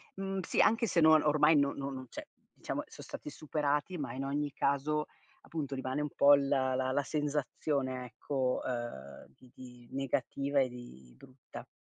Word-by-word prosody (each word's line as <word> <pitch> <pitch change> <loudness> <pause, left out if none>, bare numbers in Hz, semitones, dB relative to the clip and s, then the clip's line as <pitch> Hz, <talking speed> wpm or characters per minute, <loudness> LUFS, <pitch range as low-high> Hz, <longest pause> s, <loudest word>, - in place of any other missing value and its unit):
mhmm, 195 0 -3
sì, 175 - -2
anche 225 +1 +3
se 175 - +2
no 160 0 +7
ormai 150 +1 +5
no 140 -1 +2
no 140 0 -4
non 130 -1 -7
cioè - - -8 0.3
diciamo - - -4
so' - - -12
stati - - -7
superati 150 +3 -1
ma 135 -5 -4
in 135 +1 -4
ogni 145 +1 -2
caso, 150 +3 0 0.3
appunto 145 -4 -4
rimane 130 +2 -2
un 150 - -2
po' 145 0 +8
la 135 -2 +1
la 130 0 0
la 145 +2 +1
sensazione 145 -3 -2
ecco, 130 +1 -2
ehm, 120 - -5
di 125 - -20
di 125 -2 -13
negativa 135 +1 -1
e 130 - +1
di 65 - -12
brutta. 130 - -12
140 Hz, 175 wpm, -32 LUFS, 130-150 Hz, 0.3 s, po